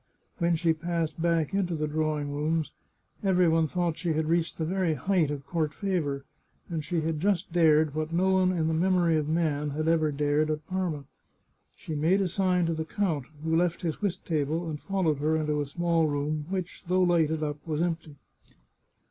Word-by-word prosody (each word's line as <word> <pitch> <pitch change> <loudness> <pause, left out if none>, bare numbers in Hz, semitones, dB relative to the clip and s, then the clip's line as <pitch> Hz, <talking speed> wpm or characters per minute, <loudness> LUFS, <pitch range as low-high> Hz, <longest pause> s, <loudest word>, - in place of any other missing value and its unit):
When 170 -1 +2
she 165 0 +2
passed 165 -1 -3
back 165 -2 +1
into 185 -3 0
the 155 -1 -1
drawing 150 -1 -1
rooms, 155 +2 -1 0.5
every 185 -2 +4
one 160 -1 +3
thought 170 -1 -1
she 170 -2 0
had 155 0 0
reached 165 +1 0
the 160 - -1
very 180 -2 0
height 180 -3 +1
of 140 -2 -4
court 155 0 -1
fa 190 -3 0
vour, 140 -2 -3 0.5
and 165 -3 -3
she 165 +2 -1
had 160 -1 -1
just 185 -1 0
dared 155 -3 +4
what 155 +1 -2
no 185 +3 +2
one 185 -1 +3
in 165 -3 0
the 160 - +1
memory 175 0 +3
of 155 -1 0
man 155 -3 0
had 155 +2 -2
ever 160 -2 +3
dared 145 +1 +1
at 155 0 -3
Parma. 180 -5 -2 0.7
She 160 - -7
made 160 +6 +2
a 195 - +1
sign 180 -1 +1
to 165 - 0
the 160 0 -2
count, 160 -6 -1 0.2
who 160 0 +1
left 170 +1 +1
his 165 +2 -2
whist 200 -4 -2
table 160 +1 -1
and 150 -2 -5
followed 180 -7 0
her 155 +2 +1
into 150 -1 0
a 145 - -3
small 170 +1 +1
room, 150 +1 -2
which, 185 -2 -4
though 185 +1 +3
lighted 160 -3 +2
up, 150 -1 -2
was 155 -2 -1
empty. 165 -3 -3
160 Hz, 200 wpm, -28 LUFS, 155-175 Hz, 0.7 s, every